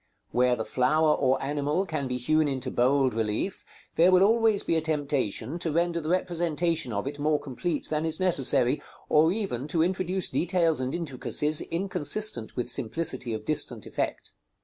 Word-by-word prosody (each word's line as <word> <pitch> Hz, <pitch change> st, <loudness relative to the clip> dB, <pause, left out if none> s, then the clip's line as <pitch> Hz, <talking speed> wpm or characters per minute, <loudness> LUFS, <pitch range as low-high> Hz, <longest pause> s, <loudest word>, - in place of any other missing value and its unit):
Where 125 Hz, 0 st, +3 dB
the 110 Hz, -, -4 dB
flower 155 Hz, +4 st, +2 dB
or 135 Hz, -1 st, +1 dB
animal 145 Hz, +6 st, -1 dB
can 155 Hz, -6 st, -3 dB
be 125 Hz, 0 st, -2 dB
hewn 155 Hz, +5 st, +2 dB
into 130 Hz, -2 st, -3 dB
bold 130 Hz, +1 st, +2 dB
relief, 110 Hz, -, -2 dB, 0.3 s
there 175 Hz, +3 st, +6 dB
will 185 Hz, 0 st, +5 dB
always 225 Hz, -1 st, +3 dB
be 165 Hz, -, 0 dB
a 160 Hz, -, +2 dB
temptation 145 Hz, -, -2 dB
to 170 Hz, -2 st, -2 dB
render 170 Hz, +1 st, 0 dB
the 155 Hz, -, -5 dB
representation 170 Hz, -4 st, 0 dB
of 100 Hz, +2 st, -3 dB
it 145 Hz, +1 st, -5 dB
more 150 Hz, 0 st, +1 dB
complete 145 Hz, +3 st, -3 dB
than 155 Hz, 0 st, -1 dB
is 160 Hz, -1 st, 0 dB
necessary, 140 Hz, -7 st, +3 dB, 0.3 s
or 155 Hz, +2 st, +4 dB
even 185 Hz, -, -3 dB
to 160 Hz, +2 st, +1 dB
introduce 185 Hz, +1 st, -1 dB
details 170 Hz, -4 st, +1 dB
and 130 Hz, +3 st, -2 dB
intricacies 150 Hz, -1 st, 0 dB
inconsistent 170 Hz, -, -2 dB
with 125 Hz, -, -2 dB
simplicity 125 Hz, +1 st, -1 dB
of 110 Hz, -1 st, -5 dB
distant 155 Hz, -, -2 dB
effect. -, -, -4 dB
155 Hz, 170 wpm, -27 LUFS, 130-170 Hz, 0.3 s, there